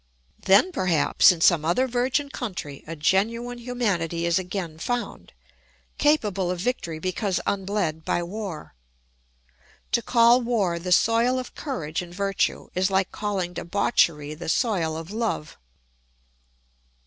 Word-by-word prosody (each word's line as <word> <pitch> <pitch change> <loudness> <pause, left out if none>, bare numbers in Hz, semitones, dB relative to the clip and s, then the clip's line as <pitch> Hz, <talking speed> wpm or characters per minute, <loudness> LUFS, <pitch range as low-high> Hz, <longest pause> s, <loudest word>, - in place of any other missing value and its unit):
Then, 200 - +5
perhaps, 180 - +4
in 170 -3 -4
some 165 -3 +5
other 175 +12 +1
virgin 255 +4 0
country 180 - -6
a 165 - -5
genuine 230 +9 0
humanity 200 -9 -1
is 170 +1 +2
again 180 -3 -5
found, 245 +6 -4 0.7
capable 210 -12 +2
of 180 -1 -2
victory 175 -7 -2
because 185 +3 -1
unbled 190 -5 -1
by 175 - 0
war. 185 - -6 1.2
To 235 - +2
call 235 +1 +5
war 205 -8 0
the 180 +1 -5
soil 230 +6 +3
of 255 -1 -5
courage 175 - -4
and 175 0 -10
virtue 195 0 -1
is 185 +1 +1
like 190 -1 +1
calling 195 -4 -3
debauchery 165 -6 +1
the 160 +1 -6
soil 170 -8 0
of 165 +3 -8
love. 215 -8 -3
190 Hz, 130 wpm, -25 LUFS, 170-235 Hz, 1.2 s, Then